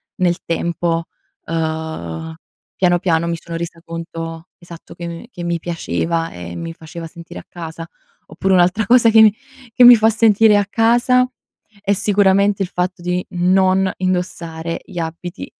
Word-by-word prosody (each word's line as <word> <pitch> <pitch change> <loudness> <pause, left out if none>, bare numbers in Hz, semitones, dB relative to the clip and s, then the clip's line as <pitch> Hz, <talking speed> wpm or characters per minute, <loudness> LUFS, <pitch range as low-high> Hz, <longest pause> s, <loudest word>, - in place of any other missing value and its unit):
nel 175 -1 +1
tempo. 170 0 -1 0.4
Uhm, 160 - -4 0.4
piano, 175 -1 +3
piano 170 -2 +1
mi 170 0 -2
sono 165 +1 -6
resa 170 0 -6
conto 165 0 -7
esatto, 170 -1 -13
che, 170 - -6
mhmm, 170 0 -7
che 180 -8 -8
mi 170 0 -1
piaceva 165 0 -2
e 85 0 -8
mi 165 0 -6
faceva 165 +1 -9
sentire 165 +1 -10
a - - -25
casa. 165 -1 -8 0.4
Oppure 190 +5 -1
un'altra 185 +4 +3
cosa 240 -2 +5
che 220 -1 +7 0.4
che 250 - +4
mi 245 0 +11
fa 220 0 +3
sentire 220 -1 +4
a 205 - +1
casa 240 +3 +3 0.5
è 200 0 0
sicuramente 200 0 +2
il 180 - -5
fatto 180 0 -3
di 180 +1 -1
non 185 +1 +2
indossare 170 -3 -3
gli 190 - -12
abiti 170 +3 -6
175 Hz, 155 wpm, -18 LUFS, 165-195 Hz, 0.5 s, mi